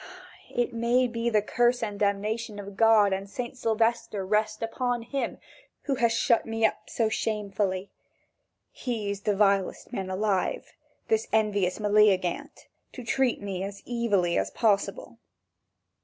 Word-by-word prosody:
Ah, 240 - +4
may 235 +2 +2
the 230 -3 0
curse 240 +2 +2
and 205 -2 -3
the 205 - +2
damnation 210 +2 -2
of 200 -1 -8
God 215 -2 +5
and 195 +1 -4
St. 240 +4 -5
Sylvester 225 -4 0
rest 215 +2 0
upon 245 +1 -1
him 270 +4 -3 0.5
who 280 - -1
has 240 -3 +2
shut 230 0 +2
me 225 0 0
up 215 - -1
so 225 - +1
shamefully! 200 -3 -2 0.8
He 225 -5 -3
is 200 0 -5
the 205 -1 0
vilest 195 -2 +1
man 190 -1 -3
alive, 190 0 -1 0.3
this 445 0 +1
envious 205 -4 +1
Meleagant, 205 -4 +2 0.3
to 255 - -8
treat 250 -1 0
me 195 -2 -4
as 195 +1 -6
evilly 205 -8 +1
as - - -1
possible!" 220 - 0
215 Hz, 140 wpm, -27 LUFS, 200-235 Hz, 0.8 s, God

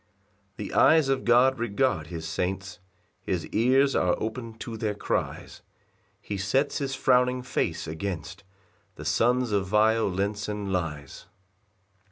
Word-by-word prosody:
3 - - -5
The - - -9
eyes 160 -4 +5
of 135 -1 0
God 125 +2 +4
regard 115 - 0
his 80 -1 -6
saints, 95 +4 -3 0.4
His - - -2
ears 130 +4 +3
are 90 - +2
open 115 +1 -5
to 115 +1 -6
their 110 -2 -2
cries; - - -3 0.6
He 100 - -5
sets 130 +9 0
his 135 -2 -2
frowning 125 -1 +2
face 125 - -2
against 95 +3 -5 0.5
The - - -9
sons 125 0 +2
of 100 -2 0
violence 105 -1 +1
and 105 -2 -3
lies. 75 -6 -4
105 Hz, 135 wpm, -26 LUFS, 95-125 Hz, 0.6 s, eyes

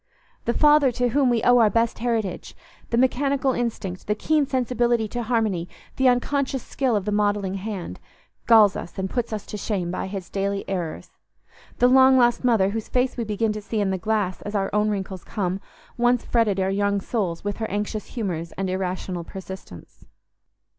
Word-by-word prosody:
The 235 - +1
father 295 -3 +5
to 245 +1 +1
whom 265 +1 +2
we 235 -2 +1
owe 245 0 +6
our 220 -2 +5
best 230 +1 0
heritage—the 230 0 -4
mechanical 265 +2 +2
instinct, 215 -7 -4
the 210 - +1
keen 300 +4 +1
sensibility 240 -3 +1
to 240 - -3
harmony, 215 -7 0 0.3
the 265 - +3
unconscious 265 +1 0
skill 260 -4 0
of 200 -2 -1
the 210 - -1
modelling 205 -2 +1
hand—galls 200 - +1
us - - -7
and 190 0 -3
puts 240 -2 -2
us 215 -2 -4
to 210 - -6
shame 190 -4 -2
by 185 - -3
his 190 -2 -6
daily 200 0 -2
errors; 175 -5 -4 0.7
the 245 - +5
long 260 +1 +6
lost 240 -1 +3
mother, 225 -6 +3
whose 220 0 -4
face 250 +1 +1
we 240 - -2
begin 215 0 -1
to 215 - -5
see 215 +1 -3
in 200 -2 +1
the 190 - -1
glass 210 -3 -1
as 205 +1 -6
our 195 -1 0
own 210 +1 +2
wrinkles 190 -3 -4
come, 195 -3 -3 0.4
once 240 0 +2
fretted 220 -5 +1
our 190 0 +1
young 200 0 +1
souls 190 -5 -2
with 205 0 -3
her 220 -1 -3
anxious 205 +1 -3
humours 175 -8 -4
and 190 -1 -3
irrational 185 -1 -3
persistence. 190 - -10
215 Hz, 180 wpm, -24 LUFS, 195-240 Hz, 0.7 s, owe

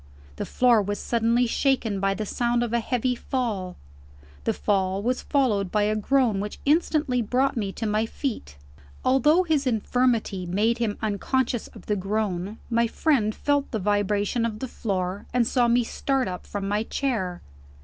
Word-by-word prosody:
The - - -4
floor 245 -3 +4
was 205 +1 -2
suddenly 235 +1 +1
shaken 230 -4 +1
by 195 0 +1
the 215 - -3
sound 240 +3 0
of 235 -1 -3
a 235 - +3
heavy 250 +2 0
fall. 225 -8 -3 0.7
The - - +2
fall 195 -1 0
was 250 +2 0
followed 215 -10 +1
by 210 -1 +2
a 210 +1 +1
groan 230 -1 +2
which 205 +1 -4
instantly 295 -4 +2
brought 255 +5 +1
me 205 -4 -2
to 225 - -4
my 215 +1 +1
feet. 220 - -5 0.5
Although 295 +7 +4
his 305 -5 +1
infirmity 225 -5 0
made 215 +6 +1
him 220 -3 -1
unconscious 230 +3 0
of - - -14
the 210 - 0
groan, 200 0 -2
my 235 0 +2
friend 230 -5 +1
felt 285 -1 0
the 225 - -2
vibration 205 +2 0
of 225 -2 -2
the 260 - -4
floor, 195 -4 -3
and 245 -2 +4
saw 245 0 +2
me 240 +1 +3
start 270 +3 -1
up 180 -1 -6
from 200 -1 -4
my 205 +1 +1
chair. 220 -8 -2
225 Hz, 170 wpm, -25 LUFS, 205-250 Hz, 0.7 s, floor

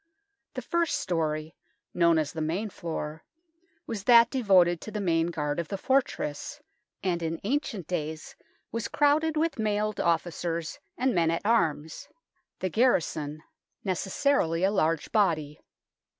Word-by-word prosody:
The 255 - -4
first 335 0 0
storey, 160 - -2 0.4
known 170 -2 +4
as 155 -2 -1
the 160 - -4
main 185 +7 -2
floor, 160 -2 -5 0.6
was 210 -4 -5
that 235 -1 +7
devoted 185 -9 +4
to - - -7
the 215 - -4
main 165 -4 +1
guard 150 -2 -2
of 170 - -3
the 195 - -4
fortress, 260 - -1 0.4
and 175 -3 0
in 165 0 -2
ancient 230 - -2
days 155 -2 -4 0.4
was 230 -1 -2
crowded 305 +2 +2
with 320 -4 0
mailed 210 -1 0
officers 170 0 -1 0.2
and 255 0 +1
men 170 -3 +2
at 165 +4 -2
arms 165 - 0 0.5
the 185 - 0
garrison; 230 -3 +2
THE 145 - -4
NORMAN 155 +1 -10
KEEP - - -39
31 195 - 0
necessarily 185 - +1
a 195 - +4
large 165 -5 0
body. 155 -8 +1
180 Hz, 150 wpm, -28 LUFS, 160-230 Hz, 0.6 s, that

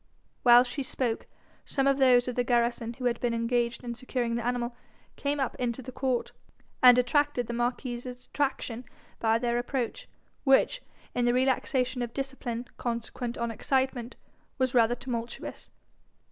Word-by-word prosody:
While 245 0 +8
she 255 +3 -4
spoke, 255 -3 -2 0.4
some 270 -2 0
of 275 0 +3
those 250 -2 +5
of 250 - -1
the 245 - +1
garrison 235 -1 +1
who 255 +1 -6
had 240 -1 +1
been 235 -1 0
engaged 235 +1 0
in 240 -1 -4
securing 245 -1 -2
the 235 0 -1
animal 245 0 -1 0.4
came 285 0 -1
up 265 - 0
into 245 +1 -2
the 255 - -7
court, 255 -1 -1 0.5
and 250 -1 +9
attracted 250 +1 +2
the 235 - -5
marquis's 240 +1 -2
attraction 250 -1 -3 0.4
by 225 0 +3
their 240 0 0
approach, 260 - -3 0.4
which, 280 - +4 0.3
in 245 - +1
the 240 0 +3
relaxation 255 0 +1
of 240 -1 -4
discipline 265 -3 -4
consequent 235 +1 -3
on 235 0 -1
excitement, 260 0 -1 0.4
was 260 -2 +1
rather 240 -1 +4
tumultuous. 235 -2 -5
245 Hz, 155 wpm, -28 LUFS, 235-260 Hz, 0.5 s, and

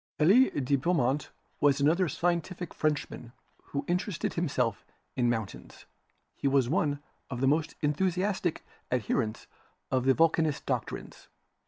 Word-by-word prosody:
Elie 205 +12 +6
de 140 0 0
Beaumont 140 -3 +1 0.3
was 145 -1 +3
another 160 +5 +3
scientific 175 +2 -2
Frenchman 145 -5 -2 0.3
who 140 0 -4
interested 180 0 -1
himself 130 - -1 0.3
in 120 -1 +2
mountains. 110 -5 -5 0.5
He - - -1
was 135 -3 +3
one 145 -1 0 0.3
of 125 -3 -4
the 135 - +2
most 155 +3 +1
enthusiastic 180 +3 0 0.3
adherents 120 -2 -1 0.5
of 130 -1 +1
the 135 -1 +5
Vulcanist 160 -2 +2
doctrines. - - -4
145 Hz, 125 wpm, -29 LUFS, 130-170 Hz, 0.5 s, Elie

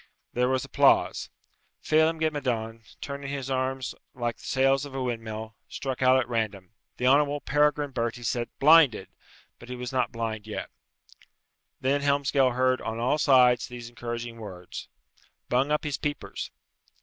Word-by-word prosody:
There 125 +1 +2
was 130 -1 0
applause. - - +3 0.5
Phelem 160 +1 +3
ghe 160 0 +1
Madone, 115 -6 -3 0.2
turning 140 -1 -5
his 135 -1 -4
arms 130 0 -1 0.2
like 120 -2 -2
the - - -14
sails 135 +1 +2
of 140 -2 -8
a 135 - -2
windmill, 110 -2 -4 0.2
struck 130 -2 -4
out 130 0 +6
at 120 - -1
random. 105 -6 -3 0.3
The 125 - -2
Honourable 145 +2 +4
Peregrine 145 0 +1
Bertie 120 -1 -3
said, 120 0 -1
"Blinded;" 140 - +5 0.5
but 120 - -13
he 125 - -4
was 125 -1 -5
not 130 -1 +1
blind 110 -2 -4
yet. 110 - -5 1.1
Then 140 +2 +1
Helmsgail 140 -2 +2
heard 130 0 +2
on 110 - -4
all 125 +6 +1
sides 125 -4 +5
these 120 -1 -8
encouraging 120 -1 -6
words, 95 -5 -8 0.6
"Bung 130 +3 +2
up 150 - +1
his 145 -3 -3
peepers!" 145 0 -4
130 Hz, 155 wpm, -27 LUFS, 120-140 Hz, 1.1 s, out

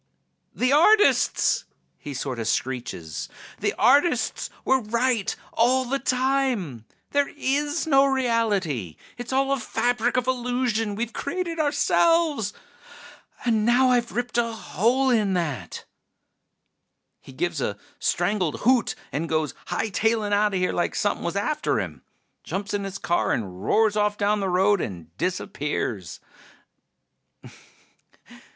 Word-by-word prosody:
"The 255 +2 +2
artists!" 415 +8 +4 0.3
he 145 -2 -7
sorta 130 -4 -3
screeches. 110 - -3 0.3
"The - - -1
artists 285 +8 +3 0.2
were 265 0 +3
right 235 -1 0 0.2
all 255 +3 +3
the 275 +3 -1
time... 255 - 0 0.3
there 285 0 +2
is 290 +4 0
no 275 -3 +5
reality! 210 - 0 0.2
It's 245 +1 -6
all 270 +1 +1
a 275 - +1
fabric 245 +1 0
of 250 - +1
illusion 245 -4 -1
we've 230 +2 -3
created 335 +2 -3
ourselves! 300 -4 +2 0.9
And 225 -3 +2
now 250 +3 +4
I've 240 -1 +1
ripped 245 0 -1
a 230 -1 0
hole 240 +5 +1
in 210 -5 +2
that!" 145 - -3 1.3
He - - -14
gives 160 +2 -2
a 100 -4 -2 0.2
strangled 180 -2 0
hoot 250 0 +3 0.2
and 160 +3 -3
goes 155 -3 0
hightailin' 220 0 0
outta 205 -1 +2
here 180 0 0
like 175 - -1
somepin' 205 - 0
was 170 - -2
after 300 +10 0
him. - - -5 0.4
Jumps 195 +1 -4
in 200 -1 -1
his 195 0 -5
car 175 -2 0
and 95 -4 -4
roars 220 - +3
off 210 0 +1
down 205 +1 +1
the 195 -1 -1
road 190 +1 +3
and 85 -4 -7
disappears. 150 - -3
220 Hz, 125 wpm, -24 LUFS, 175-260 Hz, 1.3 s, no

